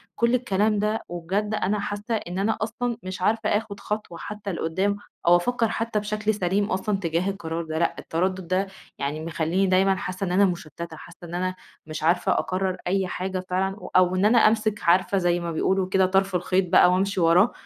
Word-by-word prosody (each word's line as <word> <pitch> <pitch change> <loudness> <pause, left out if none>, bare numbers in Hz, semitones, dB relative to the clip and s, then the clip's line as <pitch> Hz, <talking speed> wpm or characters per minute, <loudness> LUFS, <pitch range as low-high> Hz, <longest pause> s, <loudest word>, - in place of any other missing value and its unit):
كل 235 +1 +2
الكلام 210 -3 +1
ده، 215 +1 0
وبجد 190 +5 -2
أنا 205 +2 0
حاسّة 205 +3 -3
إن 180 -3 -4
أنا 220 +3 +1
أصلًا 230 +1 -2
مش 185 0 -6
عارفة 220 +2 +1
آخد 205 -1 -1
خطوة 210 -5 -4
حتّى 205 -1 -6
لقدام، 190 +5 -1 0.3
أو 175 - +8
أفكّر 230 +5 +1
حتّى 225 -2 -1
بشكل 210 +1 -1
سليم 200 +1 0
أصلًا 195 +2 0
تجاه 170 +2 0
القرار 170 -4 -4
ده، 160 0 -3
لأ 170 - +1
التردد 185 +1 -2
ده 190 +2 +1 0.3
يعني 150 +3 -3
مخلّيني 170 +4 0
دايمًا 190 +1 +3
حاسّة 185 +1 -4
إن 175 - -3
أنا 200 +2 +5
مُشتتة، 170 -2 -5
حاسّة 170 - -13
إن 175 - -6
أنا 185 +1 -1 0.3
مش 155 0 -6
عارفة 175 +2 +2
أقرر 185 0 0
أي 190 0 +1
حاجة 185 +1 -3
فعلًا 190 +1 0
و - - -9
أو 185 0 +5
إن 190 +3 +2
أنا 235 +3 +5
أمسك 215 -1 +3
عارفة 185 +3 +3
زي 175 -1 +2
ما 170 -1 -3
بيقولوا 190 +3 +1
كده 190 -1 +3
طرْف 195 0 +1
الخيط 180 +1 +1
بقى 180 - +7
وأمشي 190 0 +1
وراه، 175 +7 +5
190 Hz, 195 wpm, -25 LUFS, 175-205 Hz, 0.3 s, أو